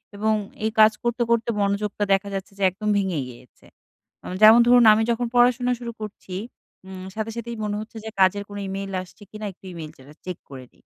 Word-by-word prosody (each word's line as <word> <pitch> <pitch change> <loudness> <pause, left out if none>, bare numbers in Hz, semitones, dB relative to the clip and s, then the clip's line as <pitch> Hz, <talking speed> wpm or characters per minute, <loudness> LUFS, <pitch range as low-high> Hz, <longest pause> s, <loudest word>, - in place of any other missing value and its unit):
এবং 220 +2 +1 0.3
এই 220 - +1
কাজ 215 0 +8
করতে, 240 0 -1
করতে 235 0 +1
মনোযোগটা 200 +1 -1
দেখা 195 +1 0
যাচ্ছে 195 +1 -5
যে 200 - -3
একদম 210 +3 -4
ভেঙে 190 -5 -1
গিয়েছে। 125 0 -16 0.7
যেমন 220 +2 +9
ধরুন 245 -1 +7
আমি 220 +1 +2
যখন 240 +1 -1
পড়াশোনা 245 +1 +4
শুরু 235 -1 -5
করছি, 195 -3 -8 0.5
উম 185 -1 -8
সাথে, 220 +1 -3
সাথেই 235 0 -5
মনে 210 -1 -2
হচ্ছে 220 +1 -10
যে 220 - -4
কাজের 200 +2 +3
কোন 205 - -8
ইমেইল 195 0 -5
আসছে 185 +3 -14
কিনা 215 0 -7
একটু 190 - -21
ইমেইল 160 -2 -8
চে - - -17 0.2
চেক 180 -1 -5
করে 130 -2 -9
দি। - - -29
210 Hz, 200 wpm, -23 LUFS, 190-225 Hz, 0.7 s, যেমন